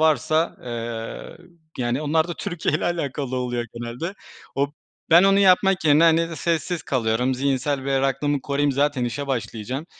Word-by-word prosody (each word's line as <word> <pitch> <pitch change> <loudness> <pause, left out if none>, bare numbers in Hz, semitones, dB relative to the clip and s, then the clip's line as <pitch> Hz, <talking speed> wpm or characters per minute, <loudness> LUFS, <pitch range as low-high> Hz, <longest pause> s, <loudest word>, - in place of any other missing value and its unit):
varsa, 160 +1 +2
eee, 115 +1 -6 0.4
yani 125 +4 -1
onlar 160 +3 +1
da 175 - -3
Türkiye 165 -3 -2
ile 155 - 0
alakalı 140 -6 -2
oluyor 120 -1 -2
genelde. 120 +11 -5 0.4
O 140 +1 +1 0.4
ben 170 +2 +8
onu 195 0 +5
yapmak 190 -1 +4
yerine, 150 +1 +5
hani, 165 0 +3
sessiz 170 0 -1
kalıyorum. 125 0 0
Zihinsel 135 +1 -1
berraklığımı 135 +1 0
koruyayım 140 +1 0
zaten 140 -1 +1
işe 140 +4 -3
başlayacağım. 125 +3 -4
140 Hz, 145 wpm, -23 LUFS, 125-160 Hz, 0.4 s, ben